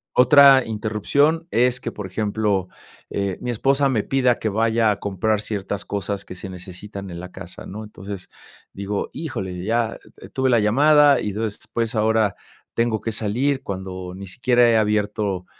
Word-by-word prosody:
Otra 135 +1 +7
interrupción 115 - 0
es 125 +1 +2
que, - - -5
por 105 -2 -6
ejemplo, 100 -1 -1 0.4
eh, 100 -2 -2
mi 125 - -3
esposa 135 +4 +2
me 115 -6 +1
pida 130 -3 +2
que 110 - -1
vaya 110 +1 +2
a 105 - 0
comprar 100 +2 0
ciertas 100 -1 -4
cosas 100 0 -3
que - - -8
se 95 +1 -8
necesitan 95 +2 -9
en 85 - -7
la 90 +1 -8
casa, 95 -2 -10
¿no?, 105 +3 -7
entonces 100 -3 -9 0.4
digo: 100 +1 -3
"Híjole," 95 - -5
ya, 115 +2 0 0.2
eh, - - -12
tuve 130 0 0
la 120 -2 +4
llamada 145 +5 +5
y 105 - -2
entonces 105 0 -3
después 115 -1 -3
ahora 110 -2 +2 0.4
tengo 115 -2 +1
que 115 - -3
salir 125 +6 0
cuando 95 -4 -6
ni 100 - -8
siquiera 120 +5 +3
he 115 - +4
abierto 105 -3 0
105 Hz, 170 wpm, -22 LUFS, 100-120 Hz, 0.4 s, Otra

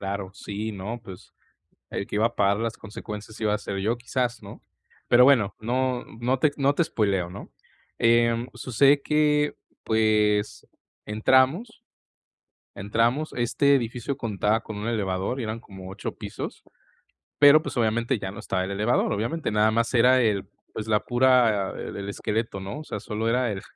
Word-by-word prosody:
Claro, 100 -1 -4
sí, 105 +3 -5
¿no?, 105 +5 -6
pues, 95 -5 -12 0.6
el 100 - -4
que - - -4
iba 110 +2 +3
a 120 - -4
pagar 100 +1 +2
las 115 0 -3
consecuencias, 105 0 -9
iba 105 -1 +1
a - - -1
ser 100 -1 -5
yo 110 +5 0
quizás, 125 0 -2
¿no? - - -11 0.4
Pero 125 +1 +6
bueno, 115 -8 +4
no 125 +2 -1 0.2
no 125 +2 +1
te 155 - +4
ex 145 - -12
no 140 +1 +2
te 170 - +2
espóileo, 100 - 0
¿no? 100 - -10 0.5
Em, 115 0 +3
sucede 140 +3 +3
que, 150 -1 +2 0.3
pues, 105 -1 +1 0.4
entramos 130 - +2 0.9
entramos 115 +9 0
este 140 +4 +2
edificio 125 +1 -2
contaba 110 -2 0
con 110 - -8
un 105 - -5
elevador, 100 +1 -2
y - - -2
eran 110 +1 -4
como 95 -4 -11
8 95 - -5
pisos, - - -7 0.8
pero, 145 +2 +8
pues, - - -6
obviamente 115 +1 +1
ya 95 - -5
no - - -10
estaba 95 -1 -2
el 95 - -5
elevador, 105 +5 +1
obviamente, 115 +11 -2
nada 105 +1 +3
más 115 +1 0
era 125 +2 +5
el, 105 -4 0 0.3
pues, 110 0 -6
la 105 -1 +3
pura 120 -5 +3
el - - -6
el 100 0 -5
esqueleto, 105 0 -3
¿no?, 100 +8 -6
o 155 - -9
sea, - - -5
solo 110 +1 -3
era 125 -1 +1
el, 95 - -6
115 Hz, 175 wpm, -25 LUFS, 105-125 Hz, 0.9 s, pero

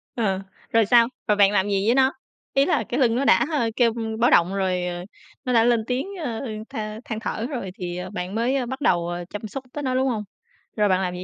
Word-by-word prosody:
Ờ, 195 -5 0 0.3
rồi 225 -2 +4
sao? 235 +1 +5 0.2
Rồi 210 - +4
bạn 200 -1 +5
làm 200 -1 +2
gì 195 0 +1
với 240 - +4
nó? 265 0 +4 0.4
Ý 275 +1 +4
là - - +1
cái 245 - -1
lưng 235 -3 +3
nó 275 - 0
đã, - - +5
a, 275 -7 +1
kêu 235 -3 +3 0.3
báo 240 - +4
động 175 +3 +4
rồi, 185 -2 0
ờ, 175 0 -5 0.4
nó 250 - 0
đã 225 -1 +5
lên 235 -2 +3
tiếng, 260 +8 -1 0.2
ờ, 230 -5 -3 0.3
than 215 0 -5
than 220 -2 -4
thở 225 0 -3
rồi 235 -10 -4
thì, 175 -1 -5
ờ, 180 - -5
bạn 190 0 -5
mới, 240 +4 +1
ơ, 260 -3 0
bắt 265 +3 -6
đầu, 175 -8 +2
ờ, 175 0 -4
chăm 215 +1 -6
sóc 265 +6 -6
tới 295 - -4
nó, 255 -1 0
đúng 265 +1 +2
hông? 220 -4 -1 0.5
Rồi 210 -1 +3
bạn 185 0 +2
làm 180 -1 -2
gì 180 0 -6
220 Hz, 255 wpm, -24 LUFS, 190-245 Hz, 0.5 s, sao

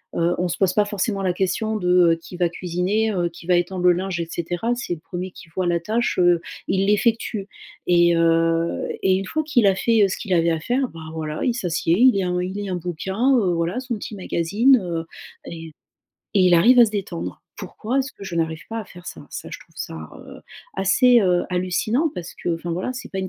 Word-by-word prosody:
heu, 170 +1 +1
on 180 - 0
se 170 - -3
pose 190 -2 +2
pas 210 +1 +3
forcément 205 0 -2
la 185 -2 +1
question 215 +4 -1
de 180 -3 +4
qui 175 +1 -10
va 175 - +2
cuisiner, 185 +6 -1
heu, 175 -4 0
qui 170 0 -14
va 180 - +4
étendre 175 +1 -2
le 180 - +7
linge 185 0 -3
et 165 - -4
cetera. 175 +7 -2
C'est 240 -8 -3
le 155 - -16
1er 180 +2 -6
qui 170 - -14
voit 185 -1 -1
la 170 0 +1
tâche, 225 +4 -1
heu, 175 -1 +4 0.3
il 190 +1 +2
l'effectue 210 -1 +1 0.4
et 170 -1 +4
heu, 165 0 +1 0.2
et 190 -1 +4
une 195 - -2
fois 310 +10 -2
qu'il 255 -8 +3
a 195 - +4
fait, 225 +1 +3
heu, - - +5
ce - - -2
qu'il 200 -5 -3
avait 170 -1 +3
à 160 - -1
faire, 255 - 0
bah, 165 - -11
voilà 155 -1 -4
il 245 - +2
s'assied, 170 -5 0
il 255 +1 +7
lit 195 - 0
un 180 -1 -1
il 180 +1 -3
lit 205 0 -4
un 185 - -1
bouquin, 190 +10 0
heu, 190 -5 +1
voilà 170 +6 -1
son 250 -2 -3
petit 210 +1 -7
magazine, 205 +8 +2
heu, 165 -2 -3 0.4
et 165 -1 -7 0.7
et 195 - +4
il 180 -1 +5
arrive 235 +10 +6
à - - +9
se 210 - -4
détendre. 195 -4 -5
Pourquoi 240 +5 -3
est-ce 270 0 -2
que - - -15
je 175 -3 -5
n'arrive 160 -1 -1
pas 225 - -3
à - - -8
faire 180 -1 -14
ça? - - -9
Ça - - -7
je - - -7
trouve - - -20
ça, 80 -1 -6 0.2
heu, - - -11 0.4
assez, 240 +6 +4
heu, 180 -3 +2
hallucinant 185 - 0
parce 175 -1 -7
que - - -3
enfin, 170 +1 -6
voilà 185 +9 -2
c'est 255 - -8
pas 190 - -3
une 190 - -3
185 Hz, 235 wpm, -22 LUFS, 170-215 Hz, 0.7 s, à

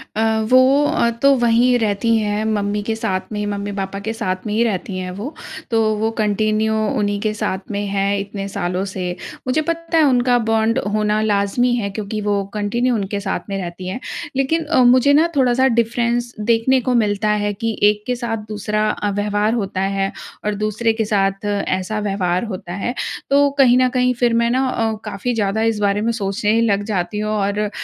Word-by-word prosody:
अ, 220 - +1 0.3
वो 255 -1 +4
तो 275 0 +6
वहीं 240 +1 +4
रहती 225 +2 +1
हैं 210 0 -1
मम्मी 205 -1 -1
के 220 - +1
साथ 200 -5 -1
में 210 0 -2
मम्मी-पापा 200 -1 -4
के 225 - -1
साथ 185 -4 -3
में 210 - -2
ही 230 +2 +2
रहती 195 -3 -2
हैं 185 0 -4
वो। 275 +9 -5 0.4
तो 225 0 +3 0.2
वो 220 +1 0
कंटिन्यू 215 +1 +1 0.3
उन्हीं 205 0 0
के 215 -1 0
साथ 190 -2 -2
में 205 0 -2
हैं 200 0 0
इतने 200 0 -5
सालों 185 -1 -2
से। 185 -1 -4 0.4
मुझे 290 +5 +2
पता 335 0 -1
है 315 - +5
उनका 250 -2 +3
बॉन्ड 225 +3 +2
होना 215 0 +1
लाज़मी 215 +4 +1
है 210 -4 -2
क्योंकि 210 +1 -4
वो 205 -1 0
कंटिन्यू 235 +4 0
उनके 200 -1 -2
साथ 195 -1 -2
में 195 - -2
रहती 180 +1 -6
हैं, 190 +7 -4 0.4
लेकिन 295 +5 +1
अ, 255 - +3
मुझे 255 +3 +5
ना 315 +4 +5
थोड़ा-सा 260 0 +3
डिफ़रेंस 235 +1 0 0.2
देखने 245 +3 +3
को 255 +1 0
मिलता 210 -2 +1
है 205 0 0
कि 225 +2 -3
एक 210 0 +4
के 250 - 0
साथ 235 -2 -3
दूसरा 215 +1 -1
अ, 205 - -2
व्यवहार 205 +2 0
होता 195 -4 -2 0.2
है 195 0 0 0.3
और 210 -1 0
दूसरे 215 +2 0
के 220 -1 -1
साथ 195 -1 0
ऐसा 200 0 -1
व्यवहार 190 -3 -1
होता 185 -5 -6
है। 200 +6 -3 0.4
तो 285 0 +4
कहीं 250 -3 +6
न 255 0 +4
कहीं 250 0 +1
फिर 240 -1 +3
मैं 235 0 +2
ना 260 +2 +1
अ, 225 -3 0
काफ़ी 210 +4 -3
ज़्यादा 215 -1 0
इस 210 - -5
बारे 205 0 +1
में 230 +2 +1
सोचने 210 +1 0
लग 205 -3 +1
जाती 195 -1 -2
हूँ 215 0 -2
और 205 0 0
215 Hz, 195 wpm, -19 LUFS, 200-235 Hz, 0.4 s, तो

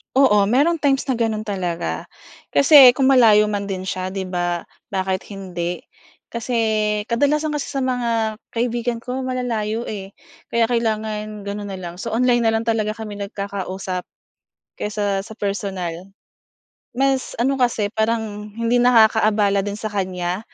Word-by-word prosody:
Oo, 230 -7 +5
mayrong 285 +11 +3
times 275 -3 +1
na 255 - +1
gano'n 220 -2 0
talaga, 185 -5 -3 0.5
kasi 280 -3 +8
kung 265 +1 +2
malayo 215 -5 +6
man 205 -1 -2
din 190 -2 -4
siya 185 0 -4
'di 190 -1 -4
ba 175 -1 -1 0.3
bakit 190 0 -1
hindi. 180 -3 -4 0.5
Kasi, 235 +1 -4 0.6
kadalasan 295 +6 +1
kasi 295 - -2
sa 280 - -4
mga 230 -4 0 0.2
kaibigan 240 0 -1
ko 255 +2 -4
malalayo, 235 -3 -2
eh, 195 -2 -7 0.4
kaya 235 -1 +4
kailangan 215 -2 -2
gano'n 205 0 -4
na 195 -1 -6
lang. 175 0 -7
So 225 +4 -5
online 240 0 +3
na 225 - +3
lang 225 - +1
talaga 215 -2 0
kami 215 -2 -7
nagkakausap, 195 -2 -5 0.7
kaysa 205 -2 -2
sa 220 - -13
personal. 195 -3 -4 0.9
Mas 270 0 0
ano 265 +3 0
kasi 220 -4 +1
parang 220 -2 -1
hindi 230 +1 +2
nakakaabala 220 -4 +4
din 205 +1 -4
sa 215 0 -5
kanya, 185 -1 -2
215 Hz, 145 wpm, -21 LUFS, 195-240 Hz, 0.9 s, kasi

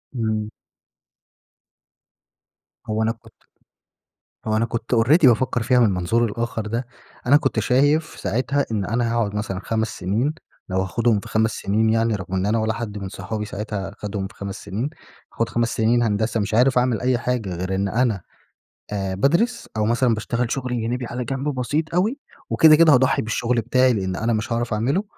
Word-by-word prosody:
إمم. 110 -2 -1 2.4
هو 110 +1 -1
أنا 115 - +2
كنت 115 - -13 1.1
هو 110 0 +1
أنا 115 - +2
كنت 115 +1 -2
already 135 +8 +5
بافكر 120 0 +3
فيها 125 +2 +3
من 115 - +6
المنظور 100 +5 +1
الآخر 115 0 -3
ده. 115 +3 -3 0.4
أنا 140 +4 +6
كنت 135 -6 0
شايف 145 +8 +3 0.2
ساعتها 140 +4 0
إن 105 -3 0
أنا 115 +2 0
هاقعد 110 -3 0
مثلًا 100 -2 -3
5 110 0 0
سنين، 110 - -1 0.3
لو 95 0 0
هاخدهم 110 +3 +1
في - - -11
5 110 0 +2
سنين 110 +2 0
يعني، 115 0 +2
رغم 95 -1 -5
إن 95 +1 0
أنا 110 +2 +2
ولا 110 0 0
حد 110 -3 -5
من 95 -1 -5
صحابي 105 +2 -5
ساعتها 105 -2 -5
خدهم 100 -2 -4
في - - -19
5 100 -1 -6
سنين، 110 +8 -3 0.4
هاخد 115 - -1
5 120 0 0
سنين 115 +2 +3
هندسة، 110 +1 0
مش 100 +1 -2
عارف 125 +3 +4
أعمل 125 -4 +1
أي 125 -1 +1
حاجة 120 -6 -2
غير 95 +2 -3
إن 100 +1 0
أنا 115 -2 +1 0.7
آآ 95 -2 -2
بادرس، 170 - +1
أو 105 - +1
مثلًا 120 +2 +2
باشتغل 120 +2 -2
شغل 125 -3 -2
جانبى 120 +2 -2
على 125 +1 -4
جنب 135 +3 -2
بسيط 150 +6 -2
أوي، 215 +10 +1 0.3
وكده 155 -1 +7
كده 160 -1 +6
هاضحي 130 +1 +3
بالشغل 115 +1 0
بتاعي، 125 +2 +3
لأن 95 -3 -2
أنا 115 +3 0
مش 110 +2 -2
هاعرف 115 -1 -1
أعمله. 130 - 0
115 Hz, 180 wpm, -22 LUFS, 105-125 Hz, 2.4 s, وكده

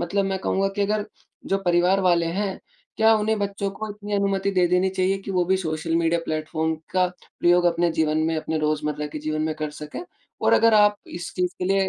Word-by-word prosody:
मतलब 195 +3 0
मैं 195 0 -1
कहूँगा 195 +1 0
कि 205 - +1
अगर 210 +1 0 0.4
जो 195 - +1
परिवार 180 +2 +3
वाले 175 -3 +3
हैं 200 -2 -2 0.4
क्या 220 0 +5
उन्हें 215 +1 0
बच्चों 200 -1 -2
को 215 +2 -6
इतनी 205 0 -8
अनुमति 200 -1 +1
दे 180 -2 +3
देनी 180 +1 +2
चाहिए 190 +1 0
कि 195 - -8
वो 180 -2 +1
भी 190 +2 +2
सोशल 160 -2 -2
मीडिया 165 0 +1
प्लेटफ़ॉर्म 160 +1 -2 0.2
का 185 -1 +3 0.3
प्रयोग 175 0 +4
अपने 170 0 +2
जीवन 155 -1 +1
में 165 - 0
अपने 155 0 -2
रोज़मर्रा 150 -1 -1
के 150 +1 -7
जीवन 155 +1 -2
में 155 0 -1
कर 155 -1 -3
सकें। 150 0 -8 0.4
और - - +2
अगर 230 -1 +5
आप 210 -1 +5
इस 175 +1 -7
चीज़ 180 -1 +1
के - - -2
लिए 195 +1 +2
180 Hz, 215 wpm, -24 LUFS, 160-195 Hz, 0.4 s, क्या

